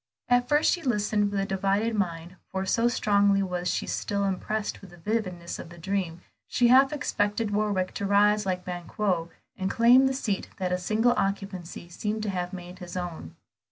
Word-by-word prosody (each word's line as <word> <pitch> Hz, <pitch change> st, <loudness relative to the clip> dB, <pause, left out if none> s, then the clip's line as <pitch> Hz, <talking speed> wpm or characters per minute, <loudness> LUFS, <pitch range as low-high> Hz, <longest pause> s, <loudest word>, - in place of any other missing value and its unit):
At 245 Hz, 0 st, +3 dB
first, 295 Hz, +1 st, +4 dB
she 350 Hz, -, -3 dB
listened 210 Hz, -6 st, +1 dB
with 200 Hz, -1 st, -2 dB
a 195 Hz, -, 0 dB
divided 195 Hz, +4 st, 0 dB
mind, 175 Hz, -3 st, -2 dB
for 190 Hz, 0 st, -2 dB
so 230 Hz, +5 st, +2 dB
strongly 200 Hz, -4 st, +3 dB
was 180 Hz, -1 st, -3 dB
she -, -, -1 dB
still 200 Hz, 0 st, -2 dB
impressed 205 Hz, +2 st, -2 dB
with 195 Hz, -, -12 dB
the 175 Hz, -, -15 dB
vividness 185 Hz, -3 st, -3 dB
of -, -, -8 dB
the 175 Hz, -, -12 dB
dream, 175 Hz, -1 st, -2 dB, 0.3 s
she 240 Hz, -1 st, +3 dB
half 265 Hz, +2 st, +6 dB
expected 210 Hz, -7 st, -1 dB
Warwick 205 Hz, -3 st, 0 dB
to 200 Hz, -, -3 dB
rise 210 Hz, +1 st, +4 dB
like 185 Hz, -2 st, -2 dB
Banquo, 175 Hz, 0 st, -2 dB, 0.3 s
and 190 Hz, -1 st, -2 dB
claim 245 Hz, +5 st, +6 dB
the 265 Hz, -, 0 dB
seat 210 Hz, -7 st, -2 dB
that 185 Hz, -2 st, -2 dB
a 180 Hz, -, 0 dB
single 220 Hz, +6 st, +2 dB
occupancy 195 Hz, -3 st, -3 dB
seemed 210 Hz, +4 st, -3 dB
to 210 Hz, -, -1 dB
have 180 Hz, -1 st, -3 dB
made 180 Hz, -1 st, -9 dB
his 180 Hz, 0 st, -7 dB
own. 170 Hz, -, -6 dB
200 Hz, 190 wpm, -27 LUFS, 180-215 Hz, 0.3 s, half